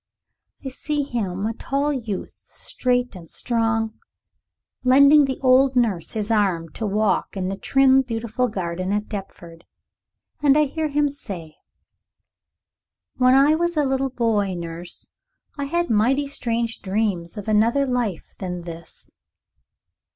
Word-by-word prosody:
I - - -2
see 290 +2 -2
him, 205 -7 -3
a 225 - -1
tall 280 +5 -1
youth, 225 -8 -5
straight 250 -2 -1
and 170 -3 -11
strong, 225 -2 -1 0.8
lending 280 +3 +7
the 265 -1 -3
old 260 0 +4
nurse 215 -9 0
his 215 0 -2
arm 190 -7 +1
to 220 +7 -4
walk 205 -1 0
in 185 -1 -2
the 195 - -2
trim, 270 +5 +4
beautiful 235 0 -2
garden 185 -3 -3
at 210 +1 -1
Deptford. 175 -4 -8 0.8
And 290 -1 +5
I 305 - +5
hear 310 +2 -2
him 295 0 +1
say 185 - -7 1.6
"When 255 0 +5
I 280 +3 +5
was 345 +1 0
a 295 - +3
little 270 0 0
boy, 215 -6 0
nurse, 170 0 -6 0.4
I 285 -2 -3
had 345 +2 -1
mighty 250 +7 +2
strange 235 -4 -2
dreams 195 -3 -2
of 205 - -7
another 230 +6 +3
life 245 -9 -2
than 180 -2 -4
this." 165 -1 -11
230 Hz, 135 wpm, -23 LUFS, 195-270 Hz, 1.6 s, lending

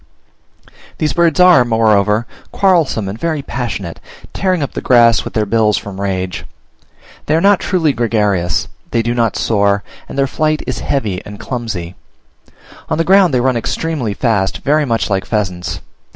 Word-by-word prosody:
These 150 -2 0
birds 170 0 +2
are, 180 -7 +7
moreover, 110 -2 +2 0.3
quarrelsome 165 - +1
and 100 +4 -6
very 160 -4 -2
passionate; 100 -11 -5 0.3
tearing 185 -5 0
up 140 - -5
the - - -4
grass 120 -3 +4
with - - -8
their 110 -1 +1
bills 105 0 +2
from 100 -1 -7
rage. 95 -2 -3 0.8
They - - +2
are - - +3
not 200 +3 +4
truly 165 -6 +1
gregarious; 105 -9 0 0.2
they 115 - 0
do 120 +1 -1
not 115 -3 0
soar, 100 -2 +1 0.3
and - - -7
their 135 - +3
flight 155 +3 -1
is - - -3
heavy 105 -10 -2
and 105 0 -10
clumsy; 105 -9 -5 1.0
on - - 0
the 165 - +2
ground 190 -1 +4
they 125 -2 +1
run 130 0 +1
extremely 125 -1 -2
fast, 105 -6 0
very 150 +1 +2
much 115 -4 -1
like 95 -1 0
pheasants. 95 -5 -3
115 Hz, 165 wpm, -16 LUFS, 100-150 Hz, 1.0 s, are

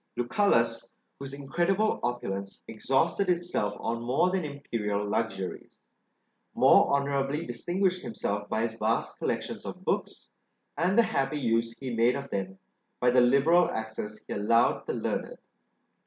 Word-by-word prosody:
Lucullus, 120 - +1 0.3
whose 135 -1 -6
incredible 175 +10 0
opulence 100 -5 -4
exhausted 135 - 0
itself 175 -12 0
on 115 0 -2
more 135 +10 +2
than 190 -2 0
imperial 110 -8 -3
luxuries, 100 -3 -3 0.8
more - - +6
honourably 140 +2 0
distinguished 180 +9 -1
himself 105 - -3
by 110 +1 0
his 115 -1 -3
vast 110 +2 -1
collections - - -3
of - - -8
books, - - -2 0.4
and 185 +5 +1
the 235 - +7
happy 135 -6 -1
use 115 -2 0
he 130 -2 -5
made 115 +2 +3
of 140 0 -6
them 95 -1 -3 0.4
by 125 0 +3
the 125 0 +5
liberal 140 +8 +4
access 110 -1 -5
he - - -5
allowed 115 +4 +2
the - - -1
learned. - - -3
125 Hz, 140 wpm, -28 LUFS, 110-155 Hz, 0.8 s, the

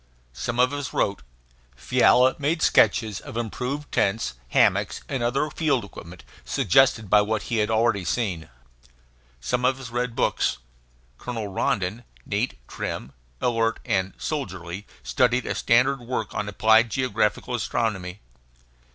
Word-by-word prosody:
Some 120 - -3
of 130 +2 +4
us 145 -2 -4
wrote. 100 -1 0 0.5
Fiala 125 - +4
made 155 +3 0
sketches 110 -4 +3
of - - -8
improved 125 +5 -4
tents, 100 - 0 0.2
hammocks, - - +2
and 135 -3 -3
other 135 +6 0
field 140 -8 0
equipment, 90 -3 -12 0.2
suggested 110 +1 +3
by 105 +2 +5
what 105 +1 -1
he 120 - -2
had 105 0 +1
already 110 -3 +2
seen. 85 -4 -2 0.9
Some 125 - -1
of 130 +1 +2
us 125 -3 -8
read 120 0 -2
books. - - +1 0.6
Colonel 115 -4 -4
Rondon, 100 +3 -1 0.2
neat, 105 - -2
trim, 65 - -5 0.3
alert, 115 -2 +1
and 95 -5 0
soldierly, 95 - -5 0.2
studied 125 -1 +2
a - - -1
standard 130 +4 +3
work 120 -2 -4
on 105 - -3
applied 110 +3 +4
geographical 110 -2 0
astronomy. 105 -6 -2
115 Hz, 135 wpm, -24 LUFS, 100-125 Hz, 0.9 s, by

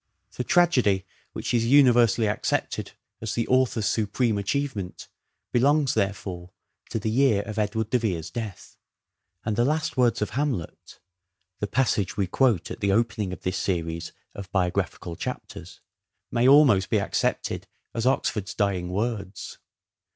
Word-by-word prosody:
The - - -2
tragedy 125 - +3 0.3
which - - -3
is 115 -1 +3
universally 120 -5 +5
accepted 105 - -2 0.3
as 110 -1 -3
the 115 - -1
author's 130 -4 +2
supreme 110 +1 +1
achievement 105 -3 -3 0.4
belongs, 140 +3 +3
therefore, 95 -5 -2 0.4
to - - -2
the 110 0 -2
year 115 -4 +3
of 110 +1 -5
Edward 110 +1 -1
de 125 - +3
Vere's 85 -8 -2
death; 110 -1 -7 0.7
and 110 -1 0
the 120 - +2
last 150 -1 0
words 120 -2 +3
of - - -5
Hamlet 130 - -3 0.3
— 90 -1 -52
the 105 - -1
passage 100 -6 0
we 100 - +2
quote 105 -1 +1
at - - -6
the 100 -1 +1
opening 105 -2 0
of 90 - -8
this 90 0 -1
series 85 -3 -2 0.2
of 100 -1 -9
biographical 90 -2 -1
chapters - - -7 0.2
— - - -56
may 120 +1 +3
almost 135 -10 +6
be - - +2
accepted - - -1 0.3
as 115 +2 -1
Oxford's 105 -6 0
dying 95 -3 0
words. 100 -1 -4
105 Hz, 150 wpm, -25 LUFS, 95-125 Hz, 0.7 s, almost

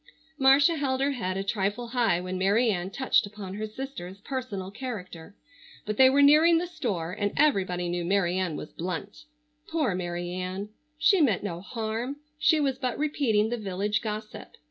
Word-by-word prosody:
Marcia 280 +5 +5
held 265 -3 0
her 275 +1 +2
head 190 -8 -3
a 195 - -1
trifle 205 +4 -2
high 235 -8 +2
when 185 +1 -4
Mary 205 +5 +3
Ann 180 -1 -2
touched 255 0 +2
upon 200 -2 -8
her 215 +2 -4
sister's 215 -6 -7
personal 210 -8 -5
character, 200 -7 -7 0.5
but 215 0 -3
they 260 0 +8
were 280 +2 +4
nearing 310 +4 +6
the 345 - 0
store, 230 - -3
and 205 +2 -1
everybody 190 -12 +2
knew 175 0 -2
Mary 180 -1 +1
Ann 185 -4 -1
was 150 - -7
blunt. 185 - -5 0.4
Poor 305 - 0
Mary 175 -1 -3
Ann! 185 +3 -4 0.3
She 360 +3 +4
meant 220 -11 +2
no 175 -4 -4
harm. 225 +5 -4 0.2
She 315 0 +4
was 270 -3 0
but 250 -2 -2
repeating 255 -8 +1
the 240 - -2
village 205 0 -1
gossip. 215 -1 -6
210 Hz, 175 wpm, -27 LUFS, 185-265 Hz, 0.5 s, they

